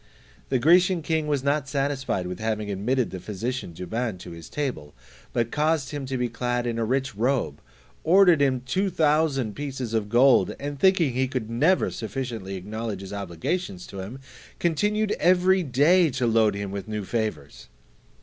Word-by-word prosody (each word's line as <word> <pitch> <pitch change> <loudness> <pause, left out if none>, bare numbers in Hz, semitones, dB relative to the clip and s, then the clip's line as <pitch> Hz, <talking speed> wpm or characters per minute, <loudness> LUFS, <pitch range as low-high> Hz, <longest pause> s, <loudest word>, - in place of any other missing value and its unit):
The 130 - +2
Grecian 175 +5 +4
king 160 -1 0
was 145 -3 0
not 140 0 0
satisfied 135 -9 -1
with 90 +3 -5
having 110 -2 -2
admitted 120 +6 0
the 95 - -5
physician 110 +4 -4
Douban 95 +5 -3
to 90 - -9
his 85 -1 -10
table, 125 - -4 0.4
but 115 -1 -1
caused 150 -2 0
him 145 -3 -5
to 130 0 -2
be 125 0 0
clad 120 +1 -2
in 115 -1 -2
a - - +1
rich 130 +2 -1
robe, 115 - -1 0.4
ordered 175 -2 +5
him 130 -3 +2
two 190 +9 0
thousand 150 - +1
pieces 135 -5 -4
of 110 -2 -1
gold, 125 +3 +4
and 145 0 -5
thinking 175 -6 +3
that 125 - -2
he 130 - +2
could 125 -4 -4
never 155 +11 +2
sufficiently 110 -3 -5
acknowledge 105 +1 -5
his 95 +1 -8
obligations 155 - -3
to 100 - -9
him, 100 +7 -6 0.4
continued 210 +6 +1
every 185 +2 +4
day 160 +5 +4
to 125 -2 -1
load 110 -3 +3
him 100 -1 -4
with 100 0 -5
new 105 -2 -4
favours. 80 - -4
130 Hz, 175 wpm, -25 LUFS, 110-150 Hz, 0.4 s, ordered